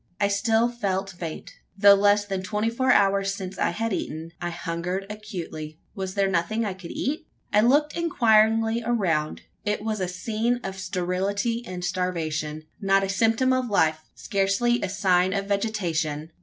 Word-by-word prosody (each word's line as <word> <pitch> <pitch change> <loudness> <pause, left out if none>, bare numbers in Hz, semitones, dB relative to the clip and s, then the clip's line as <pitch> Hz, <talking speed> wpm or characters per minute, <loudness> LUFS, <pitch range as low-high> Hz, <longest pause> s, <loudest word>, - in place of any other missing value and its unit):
I 200 -1 +2
still 220 +3 +2
felt 195 -5 -2
faint. 170 -3 -7 0.3
Though 200 0 +8
less 205 +1 +4
than 195 -2 -3
twenty 210 +3 -1
four 260 +2 +2
hours 195 -2 +3
since 190 -1 -7
I - - +2
had 225 +5 -2
eaten, 160 -2 -4
I 175 - -2
hungered 175 +2 -3
acutely. 175 -8 -7 0.2
Was 190 0 -5
there 200 -1 +2
nothing 195 +5 0
I 200 - -2
could 185 -2 -10
eat? 310 +4 -3 0.3
I 210 - +6
looked 290 +6 +3
inquiringly 225 -7 +3
around. 180 -10 0 0.2
It 210 0 -1
was 215 -1 -2
a 185 - -1
scene 220 +6 -1
of 190 0 -5
sterility 190 +5 -1
and 180 -1 -5
starvation. 160 -4 -2 0.2
Not 195 -1 +3
a 195 - -2
symptom 225 +6 +2
of 255 -2 0
life 160 -6 +2 0.2
scarcely 200 +5 +1
a 195 - -2
sign 185 -2 +2
of 200 -1 -1
vegetation! 170 -7 -1
195 Hz, 165 wpm, -25 LUFS, 180-220 Hz, 0.3 s, Though